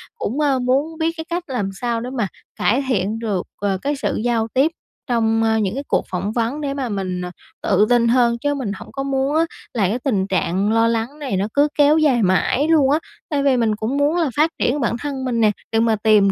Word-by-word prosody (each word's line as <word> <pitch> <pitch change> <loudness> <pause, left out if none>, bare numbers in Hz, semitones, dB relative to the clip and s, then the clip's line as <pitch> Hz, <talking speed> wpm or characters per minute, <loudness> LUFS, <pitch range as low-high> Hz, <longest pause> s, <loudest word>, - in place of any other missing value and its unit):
cũng, 265 - -3
a, 280 -3 +2
muốn 275 +6 0
biết 325 +1 +1
cái 320 - -5
cách 345 +1 -2
làm 240 -8 -2
sao 235 +3 -2
để 245 - -5
mà 220 -4 +1 0.3
cải 250 +6 +1
thiện 215 -2 0
được, 210 -6 -2
ờ, 200 -1 0
cái 290 +1 -1
sự 280 - -2
giao 230 -2 +1
tiếp 275 +5 +3 0.4
trong, 225 -2 +1
a, 220 0 +2
những 195 -3 0
cái 275 - -3
cuộc - - +1
phỏng 190 +3 -2
vấn 235 +6 -1
để 280 -2 -2
mà 270 -3 -3
mình, 185 -3 -3
ờ, 180 0 -5 0.3
tự 210 - +3
tin 240 -1 +4
hơn, 235 -1 +3
chứ 290 +4 -1
mình 260 -8 -3
hổng - - -11
có 275 0 -4
muốn 275 +1 0
á 325 +1 +3 0.3
là 210 -7 +1
cái 230 +5 -1
tình 210 -8 0
trạng 190 +1 0
lo 225 +1 +3
lắng 230 +6 -2
này 265 -10 -2
nó 200 - 0
cứ 285 +1 +4
kéo 295 +1 +5
dài 275 -7 +3
mãi 190 - +2
luôn 300 -5 +4
á. 300 - +3 0.3
Tại 285 -2 0
vì 270 -2 +3
mình 225 -3 +1
cũng 220 +6 -2
muốn 290 +4 +2
là 330 -4 +1
phát 310 +2 +4
triển 275 +4 +1
bản 235 -3 0
thân 275 -2 -4
mình 235 -2 0
nè, 215 -1 +5 0.2
để 225 - +2
mà 225 -1 +3
tìm 210 -2 +4
240 Hz, 245 wpm, -20 LUFS, 215-280 Hz, 0.4 s, kéo